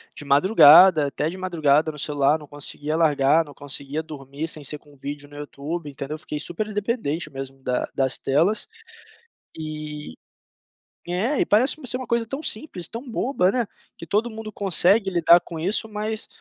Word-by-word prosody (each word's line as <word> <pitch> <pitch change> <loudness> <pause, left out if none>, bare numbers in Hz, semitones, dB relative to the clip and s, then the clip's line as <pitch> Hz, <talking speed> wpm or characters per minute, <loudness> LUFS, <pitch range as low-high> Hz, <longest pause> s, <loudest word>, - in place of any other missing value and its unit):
de - - -7
madrugada 155 +1 +7
até 145 +2 -2
de 185 - -7
madrugada 155 -4 +2
no 150 - -12
celular, 145 +1 +1
não 150 - -12
conseguia 145 +1 -5
largar, 155 -1 +3
não 145 -2 -13
conseguia 145 +2 -5
dormir 145 0 -7
sem 155 -2 -5
ser 150 +2 -4
com 145 -1 -21
vídeo 145 +1 -7
no 145 - -15
YouTube 145 +2 -6
entendeu, 140 +1 -6
eu 155 - -5
fiquei 150 - -5
super 210 +7 -4
dependente 200 - -2
mesmo 135 0 -7
da 125 0 -1
das 130 -1 0
telas, 170 +10 +1 0.9
e 150 - -6 0.9
é 215 +11 0
e - - +3
parece 230 +7 +3
ser 250 - +1
uma 255 - -6
coisa 235 -1 0
tão 275 +5 -5
simples, 215 - -2
tão 240 +3 -8
boba, 225 -6 +1
né, 245 -1 0 0.3
que - - -9
todo 215 +8 0
mundo 220 -1 -8
consegue 195 +1 +3
lidar 170 -1 +5
com 170 -2 -8
isso, 205 +6 -1
mas 215 +1 -4
160 Hz, 175 wpm, -23 LUFS, 145-205 Hz, 0.9 s, madrugada